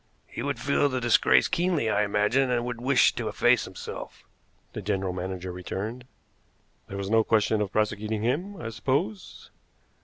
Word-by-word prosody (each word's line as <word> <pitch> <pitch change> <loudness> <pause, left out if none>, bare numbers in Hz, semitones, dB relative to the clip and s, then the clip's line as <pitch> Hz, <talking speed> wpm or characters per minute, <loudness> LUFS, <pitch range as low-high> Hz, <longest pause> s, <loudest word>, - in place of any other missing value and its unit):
"He - - -7
would 140 -3 -2
feel 140 +3 +2
the 130 -1 -1
disgrace 120 -2 +4
keenly, 170 -8 0
I 110 - +2
imagine, 105 +6 +2
and 120 -1 0
would 120 -1 -5
wish 130 +1 +4
to - - -4
efface - - +3
himself," - - -8 0.5
the - - -5
general 95 -2 -1
manager 90 0 -5
returned. 100 +7 -5 0.8
"There 100 - -7
was 100 +1 -4
no 115 0 +5
question 110 0 +2
of 100 -3 -2
prosecuting 105 0 -1
him, 175 - -1
I 115 - -5
suppose?" 110 -3 -3
110 Hz, 160 wpm, -27 LUFS, 100-125 Hz, 0.8 s, no